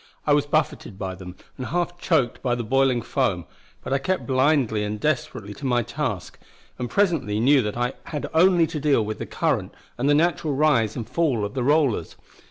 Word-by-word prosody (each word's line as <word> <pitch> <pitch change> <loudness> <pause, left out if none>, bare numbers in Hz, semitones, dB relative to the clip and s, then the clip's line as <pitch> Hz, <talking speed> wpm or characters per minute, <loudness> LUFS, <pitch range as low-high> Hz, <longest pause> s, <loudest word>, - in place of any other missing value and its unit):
I 145 - +4
was 145 0 +2
buffeted 150 -8 -1
by 95 -2 -4
them, 90 0 -10 0.2
and 130 - -5
half 175 0 -2
choked 145 -11 +1
by 125 -2 0
the 120 - -3
boiling 130 0 +2
foam; - - -1 0.4
but 130 - -3
I 135 - +2
kept 185 +7 -1
blindly 130 -5 +2
and 105 0 -3
desperately 115 -7 -2
to 135 - -9
my 120 -1 +2
task, 120 -7 -4 0.4
and 125 -1 -3
presently 160 - +1
knew 135 +4 +5
that 105 0 -3
I 120 +2 0
had 150 -3 -4
only 175 +1 +5
to 160 -1 -5
deal 140 -7 +2
with 110 +1 -5
the - - -5
current - - -1 0.2
and 135 +3 +1
the 145 - +5
natural 160 -2 +1
rise 130 -8 +2
and 115 -3 -5
fall 140 -11 0
of 100 - -6
the 135 - -2
rollers. 140 -2 +1
135 Hz, 200 wpm, -24 LUFS, 115-155 Hz, 0.4 s, knew